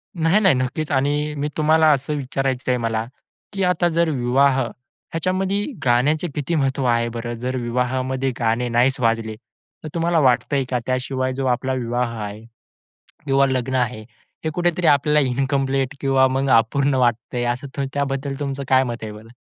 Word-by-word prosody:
नाही, 165 +4 +3
नाही. 190 -8 +4
नक्कीच. 130 +5 -2
आणि 145 +2 0
मी 145 +1 -1
तुम्हाला 155 +1 +4
असं 140 +1 0
विचारायचं 130 -1 -2
आहे 125 - +2
मला 115 -1 -1 0.5
की 195 -1 -1
आता 180 -1 +2
जर 170 0 +1
विवाह 135 0 +2
ह्याच्यामध्ये 185 - -3 0.2
गाण्याचे 140 +7 +2
किती 150 +3 -2
महत्व 135 -2 0
आहे 115 -1 +2
बरं? 120 0 -5
जर 125 +2 -4
विवाहामध्ये 130 +2 -1
गाणे 115 +1 +1
नाहीच 125 +3 +2
वाजले 115 -2 0 0.5
तर - - -5
तुम्हाला 170 0 +2
वाटतंय 130 0 +2
का 125 - 0
त्याशिवाय 130 0 -1
जो 135 +1 -3
आपला 130 +1 0
विवाह 120 -1 -2
आहे 105 +1 -7 0.8
किंवा 140 -1 +3
लग्न 130 -1 -1
आहे 125 -3 -1 0.4
हे - - +1
कुठेतरी 175 0 0
आपल्याला 150 +1 +4
इनकम्प्लीट 135 +1 0
किंवा 135 -1 +4
मग 135 +1 -1
अपूर्ण 135 +5 +1
वाटतंय, 120 -1 0
असं 135 +3 -3
त्याबद्दल 140 -1 -2
तुमचं 140 -1 -3
काय 130 0 +4
मत 120 -2 -4
आहे 110 - -5
बरं? 105 +1 -12
130 Hz, 160 wpm, -21 LUFS, 125-145 Hz, 0.8 s, नाही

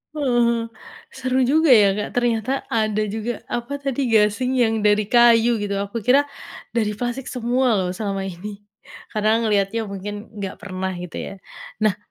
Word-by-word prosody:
Uh 255 -5 +1
hah, 235 0 +1 0.5
seru 260 0 -1
juga 290 +3 +5
ya, 210 -4 +6
Kak, 210 - -3
ternyata 240 -1 0 0.2
ada 215 -2 0
juga, 220 +2 -4
apa 245 +4 -4
tadi, 275 -1 -1
gasing 220 +4 +3
yang 220 -2 +1
dari 210 0 +3
kayu 235 -1 +5
gitu, 205 -1 -3
aku 200 +2 -5
kira 270 +3 +6 0.5
dari 215 -2 0
plastik 245 +4 -4
semua 250 0 0
loh 190 -3 0
selama 200 -2 -2
ini, 195 +2 -7 0.5
karena 215 +1 +1
ngelihatnya 210 0 0
mungkin 205 +2 -6
nggak 195 -2 -6
pernah 190 -2 -4
gitu 175 -2 -7
ya. - - -5 0.5
Nah, 215 -3 +2
220 Hz, 160 wpm, -22 LUFS, 205-245 Hz, 0.5 s, ya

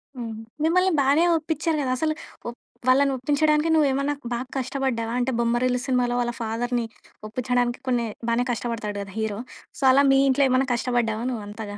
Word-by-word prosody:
హ్మ్. 230 -2 -5 0.3
మిమ్మల్ని 365 +3 +3
బానే 285 +5 +4
ఒప్పించారు 315 0 -1
గదా! 255 -2 -1
అసలు 310 +3 0 0.3
ఒ - - -1 0.4
వాళ్ళని 275 +2 +4
ఒప్పించడానికి 300 +4 +2
నువ్వేమన్నా 280 -1 +2 0.2
బాగా 245 +2 -3
కష్టపడ్డావా? 255 -3 -2
అంటే 255 +2 0
బొమ్మరిల్లు 245 +1 +1
సినిమాలో 245 -2 +1
వాళ్ళ 240 0 -1
ఫాదర్‌ని 235 +1 -1 0.4
ఒప్పించడానికి 245 +1 -1
కొన్ని 240 -2 +1 0.2
బానే 240 +1 +1
కష్టపడతాడు 225 -2 -3
గదా! 195 -1 -8
హీరో. 220 -1 -2 0.4
సో, - - -5
అలా 280 +2 +5
మీ 270 - +5
ఇంట్లో 275 +1 +3
ఏమన్నా 260 +1 +2
కష్టపడ్డావా 235 -2 0
నువ్వంతగా? 205 -2 -6
250 Hz, 155 wpm, -24 LUFS, 235-275 Hz, 0.4 s, అలా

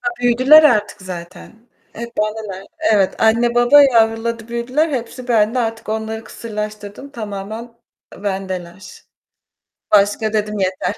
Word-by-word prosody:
Ha, 365 - -1
büyüdüler 255 +6 +6
artık 210 -7 +2
zaten. 185 +6 -10 0.2
Hep 235 +1 -7
anneler 210 -3 -4 0.3
Evet, 195 -3 +2
anne, 230 +2 +3
baba 240 +4 +6
yavruladı 230 -2 +1
büyüdüler, 250 +7 -1
hepsi 250 -2 -5
bende 225 +1 +2
artık 225 -2 -3
onları 220 +1 -4
kısırlaştırdım, 215 +2 -7
tamamen 220 0 -7 0.5
bendeler. 190 -2 -6 0.9
Başka 210 +1 +2
dedim 210 -1 -1
yeter. 185 +1 -1
220 Hz, 115 wpm, -18 LUFS, 205-235 Hz, 0.9 s, büyüdüler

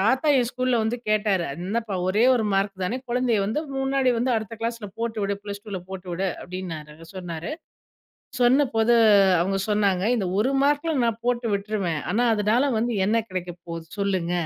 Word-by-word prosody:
தாத்தா 260 +9 +2
என் 240 -2 +1
ஸ்கூல்ல 255 -2 0
வந்து 220 +2 -1
கேட்டாரு. 210 -4 +2 0.2
"என்னப்பா! 220 +1 -2
ஒரே 205 +5 +3
1 235 -3 +1
மார்க் 195 -1 0
தானே! 215 +7 -1
குழந்தையை 240 -3 +1
வந்து 220 +9 -1 0.2
முன்னாடி 270 -1 +1
வந்து 250 +2 0
அடுத்த 220 +1 -5
கிளாஸ்ல 230 -2 -3
போட்டு 230 -1 -3
விடு. 200 0 0
+2ல 205 -1 -6
போட்டு 190 -1 -7
விடு." 190 +2 -1
அப்படின்னாரு. 165 -5 -7 0.2
சொன்னாரு. 175 - -5 0.9
சொன்ன 260 +4 +5
போது, 225 +1 +4 0.5
அவுங்க 195 +3 0
சொன்னாங்க, 200 -3 +2
"இந்த 200 -5 -1
ஒரு 230 +6 +2
மார்க்குல 295 +3 +1
நான் 230 -1 -1
போட்டு 245 -1 0
விட்ருவேன். 200 -6 -2
ஆனா 235 +4 +2
அதுனால 215 +5 +2
வந்து 235 +1 0
என்ன 225 +2 +2
கிடைக்க 180 -2 -4
போகுது. 165 -1 -6
சொல்லுங்க. 190 -4 0
215 Hz, 165 wpm, -24 LUFS, 190-240 Hz, 0.9 s, சொன்ன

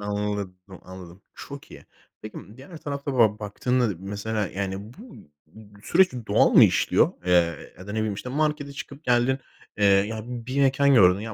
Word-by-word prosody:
anladım, 105 -2 -3 0.2
anladım, 95 0 -12
çok - - -10
iyi. - - -13 0.4
Peki 110 - -8 0.2
diğer 140 +6 -12
tarafta 140 -2 -5
böyle 105 -2 +4
baktığında, 110 +2 -1
mesela 105 +2 -3
yani 95 +1 -4 0.2
bu 225 - -14 0.3
b 100 +4 -17
süreç 185 +2 +4 0.2
doğal - - +3
mı - - +8
işliyor? - - +2
Eee, 85 -3 +1
ya 95 - -11
da 105 - -6
ne 110 - -2
bileyim 110 -2 -1
işte 105 +5 -7
markete 150 0 -1
çıkıp 140 +2 -10
geldin, 125 +2 +2 0.4
eee, 105 - +2
ya 100 +3 +2
bir 125 +2 -4
mekân 140 +1 +3
gördün, 95 -4 +5
ya 110 +1 -6
110 Hz, 170 wpm, -24 LUFS, 100-135 Hz, 0.4 s, mı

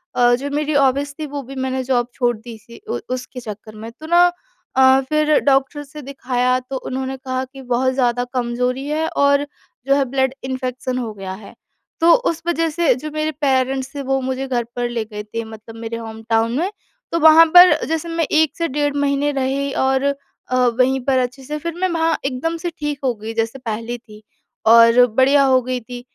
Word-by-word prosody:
अ, 245 0 +4
जो 275 +3 -5
मेरी 300 +1 -1
हॉबीज़ 280 +1 +2
थी 310 - -3
वो 285 -1 -5
भी 270 +2 -10
मैंने 260 0 -2
जॉब 245 -2 0
छोड़ 245 -2 0
दी 225 +1 -10
थी 235 +2 -15
उ - - -2
उसके 250 0 -6
चक्कर 215 -1 -9
में। 220 +2 -8
तो 310 +7 -13
ना 345 +1 +6 0.5
अ, 265 0 +6
फ़िर 305 0 +3
डॉक्टर 275 +1 +1
से 300 +1 -11
दिखाया 255 -2 -1
तो 255 +1 -6
उन्होंने 265 +1 -4
कहा 260 -1 -3
कि 270 +1 -13
बहुत 255 +1 0
ज़्यादा 245 -2 +1
कमजोरी 250 +2 -1
है 310 +2 -1
और 280 -1 +2 0.4
जो 275 - +4
है 280 -1 +2
ब्लड 265 0 0
इन्फेक्शन 255 -1 -3
हो 235 -4 -4
गया 195 -2 -7
है। 200 +3 -11 0.5
तो 335 +1 +5 0.2
उस 330 -1 -4
वजह 330 -1 +1
से 315 -3 +2
जो 305 +5 -6
मेरे 310 +1 -1
पेरेंट्स 265 -1 0
थे 285 - -3
वो 270 0 0
मुझे 260 +1 -3
घर 245 -2 0
पर 245 0 -1
ले 235 -2 -2
गए 210 -1 -7
थे 230 +2 -5
मतलब 220 0 -11
मेरे 230 0 -5
होम 225 -1 -8
टाउन 225 0 +2
में। 360 +4 0 0.4
तो 335 - 0
वहाँ 320 +1 +8
पर 355 0 +10
जैसे 325 +1 -2
मैं 330 -1 0
1 310 -1 +3
से 335 - 0
डेढ़ 290 0 -1
महीने 285 0 +1
रही 275 0 -1
और 265 0 +1
अ, 280 -2 -4
वहीं 255 +1 +2
पर 270 -1 +2
अच्छे 255 +2 -3
से 300 +3 -4
फ़िर 335 +2 -4
मैं 375 - +3
वहाँ 330 -1 +1
एकदम 275 +5 -2
से 345 +1 -3
ठीक 295 -2 -3
हो 255 -2 +1
गई 220 +1 -7
जैसे 225 +3 -2
पहली 230 0 -4
थी। 215 -3 -16 0.4
और 230 +2 +7
बढ़िया 275 +2 +5
हो 260 -1 +4
गई 255 0 -3
थी 245 +1 -9
260 Hz, 210 wpm, -19 LUFS, 245-285 Hz, 0.5 s, पर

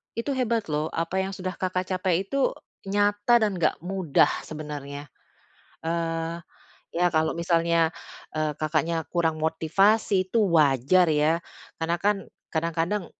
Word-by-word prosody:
Itu 235 +5 -2
hebat 230 -5 0
loh, 150 +1 0
apa 165 +3 -2
yang 195 - -4
sudah 185 0 -4
Kakak 185 0 -1
capai 185 0 +1
itu 275 +4 +1 0.4
nyata 205 +3 +3
dan 210 - +2
nggak 155 - +1
mudah 180 -5 +2 0.2
sebenarnya. 145 -2 -7 0.8
Eee, 165 0 -2 0.6
ya, 175 +1 +3
kalau 160 +1 +2
misalnya, 170 -1 +2 0.4
eee, 155 0 0
Kakaknya 160 +1 0
kurang 165 -2 0
motivasi 185 +5 +2
itu 230 - +1 0.2
wajar 150 +4 +4
ya, 155 +2 +3 0.4
karena 170 +1 +1
kan 205 +1 +3 0.4
kadang-kadang 165 +4 -1
170 Hz, 125 wpm, -26 LUFS, 160-190 Hz, 0.8 s, wajar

